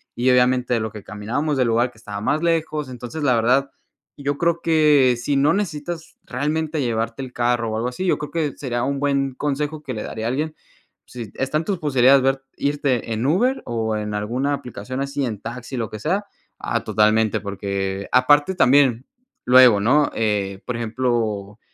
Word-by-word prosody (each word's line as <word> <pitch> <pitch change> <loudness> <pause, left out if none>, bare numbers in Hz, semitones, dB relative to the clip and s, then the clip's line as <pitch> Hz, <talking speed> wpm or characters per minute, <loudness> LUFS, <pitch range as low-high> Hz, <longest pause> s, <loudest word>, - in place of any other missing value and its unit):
y 125 +2 +1
obviamente 125 0 +3
a - - +1
lo 110 0 -3
que 105 -2 -10
caminábamos 115 +9 -2
del 125 -2 +2
lugar 120 +2 +1
que 115 - -23
estaba 105 -2 -7
más 150 +7 0
lejos, 155 -4 0
entonces 125 +4 -7
la 125 -4 +3
verdad, 125 +4 +2 0.5
yo 140 0 -2
creo 170 0 +1
que 150 -6 +4
si 145 +4 0
no 140 +2 +4
necesitas 165 -4 -4
realmente 150 +3 -2
llevarte 115 +1 -2
el 125 - -8
carro 120 -1 0
o - - -2
algo 120 +2 -1
así, 185 +10 -5
yo - - +2
creo 150 -1 -6
que 155 -5 -2
sería 120 -3 -2
un 140 0 -1
buen 140 -2 0
consejo 150 +2 -2
que 130 -2 -5
le 110 - -4
daría 110 0 -5
a - - 0
alguien. 155 +5 -2 0.5
Sí 115 -4 -8
están 145 +4 -1
en - - -10
tus 195 -4 -2
posibilidades 135 -2 +4
ver 135 0 +1
irte 140 -5 -1
en 110 +3 -2
Uber 235 - +2
o 110 -2 -2
en 105 0 -4
alguna 120 +7 -1
aplicación 130 0 -5
así 140 0 -2
en 110 -5 -4
taxi, 120 +2 -7
lo 115 -4 -2
que 110 - -7
sea, 190 - -1 0.3
ah, - - -1
totalmente, 110 0 +2
porque 100 -1 -3
aparte 145 +7 +4
también, 130 -5 +4 0.4
luego, 125 -5 +7
¿no?, 145 +7 +3
eh, 100 -3 -1
por 125 -2 -3
ejemplo, 115 -3 -2
125 Hz, 190 wpm, -22 LUFS, 115-145 Hz, 0.5 s, luego